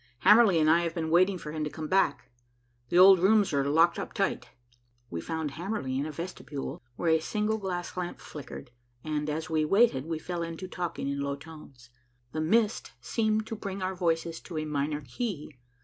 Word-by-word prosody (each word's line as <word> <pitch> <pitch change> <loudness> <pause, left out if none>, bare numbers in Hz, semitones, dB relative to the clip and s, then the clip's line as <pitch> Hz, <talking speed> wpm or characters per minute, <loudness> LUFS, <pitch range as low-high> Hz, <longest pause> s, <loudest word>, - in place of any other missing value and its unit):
"Hamerly 210 -4 +7
and 155 - +3
I 165 +2 +5
have 170 -1 -3
been 160 -2 -2
waiting 185 +3 +4
for 150 -3 -7
him 155 0 -3
to 150 - -2
come 155 +1 -6
back. 130 -9 +1 0.6
The 175 - +1
old 190 0 +9
rooms 200 -1 +4
are 140 -1 +2
locked 165 +3 +4
up - - -5
tight." - - -1 0.6
We 85 - -3
found 160 - -3
Hamerly 170 -4 -3
in 145 - -2
a - - -5
vestibule 155 -3 -6
where 165 +4 +1
a 160 - +4
single 210 +6 -1
gas 180 -3 -4
lamp 180 -1 -4
flickered, 130 -4 -9 0.3
and, 150 -1 -2
as 155 +1 -3
we 155 -1 +1
waited, 160 - +3
we 165 -1 -2
fell 175 +2 -4
to 185 +3 -7
talking 175 -5 -4
in 140 0 -2
low 140 0 -2
tones. 140 -5 -14 0.4
The 155 - -2
mist 215 +7 +1
seemed 220 -1 0
to 225 - -5
bring 195 -2 -5
our 185 +1 -1
voices 165 -2 -1
to 165 - -8
a 155 - -2
minor 150 0 -2
key. 150 - -5
165 Hz, 195 wpm, -28 LUFS, 150-190 Hz, 0.6 s, old